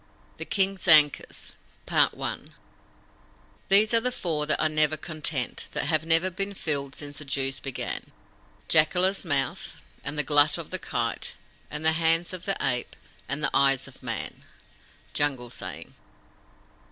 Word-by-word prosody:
THE - - -5
KING'S 195 -1 0
ANKUS 150 -3 +5 2.1
These 200 +3 +5
are 230 - +5
the 250 +2 -1
Four 155 -9 -2
that 155 - +1
are - - +2
never 155 0 +3
content, 155 -6 -3
that - - -1
have 155 -1 -1
never 165 +3 +3
been 195 +2 -4
filled 140 -5 -3
since 145 0 -6
the 150 - -9
Dews 135 -1 -2
began 135 -2 -5 0.6
Jacala's 180 +5 +4
mouth, 140 -6 -1 0.3
and 150 - -4
the 150 - +3
glut 145 0 +4
of 165 -3 -8
the 185 - -2
Kite, 115 -6 -4 0.3
and 150 +1 -5
the 160 - +7
hands 165 +2 +1
of 185 -1 -8
the 195 - 0
Ape, 125 -3 -1 0.3
and 145 +2 -3
the - - +1
Eyes 135 -1 +3
of - - -16
Man. - - -4 0.7
Jungle 135 -5 -1
Saying. - - -6
155 Hz, 145 wpm, -26 LUFS, 140-175 Hz, 2.1 s, the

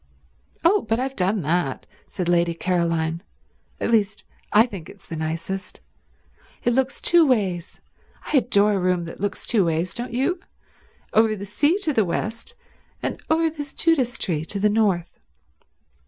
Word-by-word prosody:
"Oh, 385 +4 +4
but 225 +1 +2
I've 265 +1 -2
done 190 0 0
that," 155 -3 -1 0.2
said 180 - -4
Lady 170 -1 +2
Caroline. 165 -2 0 0.6
"At - - -1
least, 210 -2 +1 0.3
I 215 +2 +6
think 195 -9 -9
it's - - -14
the 165 - -6
nicest. 165 +5 -4 0.8
It 245 - +2
looks 265 +2 0
two 345 -1 +6
ways—I 200 - -2
adore 210 -4 +3
a 195 - +1
room 180 -1 +1
that 165 - -9
looks 200 -2 -2
two 215 -5 +3
ways, 170 +1 -1
don't 240 +1 -4
you? 275 +9 0 0.7
Over 220 0 +4
the 200 -1 -7
sea 290 - +2
to 310 - +1
the 220 - +3
west, 225 - -3 0.5
and - - -3
over 325 +1 +3
this 295 -3 -6
Judas 265 -7 +1
tree 160 -4 -1
to 200 - -3
the 210 +1 +3
north." 200 -5 0
205 Hz, 155 wpm, -23 LUFS, 175-250 Hz, 0.8 s, I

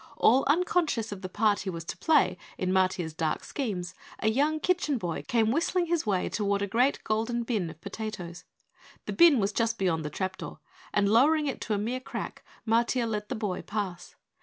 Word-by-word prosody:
All 255 +4 +5
unconscious 310 - +1
of 200 -2 -6
the 185 - -5
part 210 +1 +2
he 195 - -4
was 165 -2 -5
to 165 - -5
play 300 - +3 0.2
in 185 0 -1
Matiah's 185 -3 +1
dark 155 0 -1
schemes, 185 -10 -4 0.2
a 220 - +1
young 295 +7 +1
Kitchen 335 -5 +1
Boy 175 -7 -3
came 225 -2 +2
whistling 335 +5 +1
his 335 -7 -1
way 190 -3 +1
toward 200 -1 0
a - - -1
great 250 +7 +1
golden 225 +2 -1
bin 215 -8 -1
of 160 0 -11
potatoes. 195 -4 -6 0.6
The - - -3
bin 335 -6 +6
was 200 0 +1
just 230 0 0
beyond 170 -4 0
the 150 - -3
trapdoor, 190 +5 -4 0.3
and 205 -1 +2
lowering 295 +9 +4
it 275 - -3
to 215 - -1
a - - 0
mere 235 +5 -2
crack, 270 +1 -6 0.2
Matiah 235 +2 +2
let 210 -1 -3
the - - -2
boy 205 -4 -2
pass. 195 -5 -5
220 Hz, 195 wpm, -28 LUFS, 190-255 Hz, 0.6 s, bin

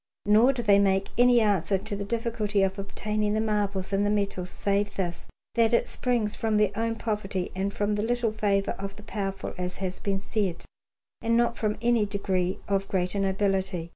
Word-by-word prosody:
Nor 215 +5 +6
do 250 -3 -3
they 200 -2 +5
make 195 -1 +2
any 245 -1 +5
answer 200 -2 +2
to 200 +2 -5
the 200 - -4
difficulty 215 -2 0
of 195 +1 -1
obtaining 210 +1 -1
the - - +1
marbles 205 -3 -1
and 195 +1 +2
the 205 - +2
metals, 200 -3 -1
save 200 +1 -1
this, 175 -3 -3 0.2
that 230 0 +3
it 235 - +3
springs 235 -4 0
from 220 -1 0
their 210 -2 +3
own 225 +1 -1
poverty 205 -5 -3
and 195 +1 -1
from 205 +1 -1
the 205 - 0
little 235 0 0
favour 200 -2 +1
of 195 0 -5
the 210 - -13
powerful, 195 -2 -4
as 180 0 -2
has 185 -1 -4
been 195 -1 -1
said, 195 -3 -2 0.6
and 230 0 +2
not 235 0 +2
from 210 -2 -1
any 235 -3 +3
degree 190 -2 -1
of 195 -1 0
greater 185 +1 -1
nobility. 190 -3 0
205 Hz, 195 wpm, -27 LUFS, 195-220 Hz, 0.6 s, Nor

